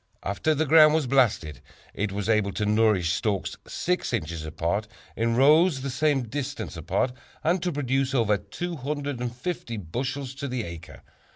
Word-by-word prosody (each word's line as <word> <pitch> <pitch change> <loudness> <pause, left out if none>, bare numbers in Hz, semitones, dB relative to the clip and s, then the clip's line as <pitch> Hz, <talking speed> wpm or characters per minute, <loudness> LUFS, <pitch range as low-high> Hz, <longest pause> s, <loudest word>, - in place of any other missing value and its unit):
After 100 +11 0
the 160 +2 +1
ground 155 +1 +7
was 160 -3 +1
blasted, 110 - +1 0.3
it 100 0 -2
was 100 +1 -3
able 110 -3 +2
to 105 +3 -1
nourish 105 -5 +3
stalks 105 -4 -1
6 180 -6 -1
inches 85 -7 -2
apart 85 +7 -2 0.3
in 115 0 +1
rows 150 +3 +5
the 135 0 -3
same 140 0 +1
distance 140 -1 -5
apart, 85 +10 0 0.3
and 170 +3 +2
to 180 0 0
produce 135 -2 0
over 110 -4 +3
250 140 - -4
bushels 130 - -4
to 140 +1 -5
the 125 -3 -2
acre. 85 -2 -9
125 Hz, 155 wpm, -26 LUFS, 105-145 Hz, 0.3 s, ground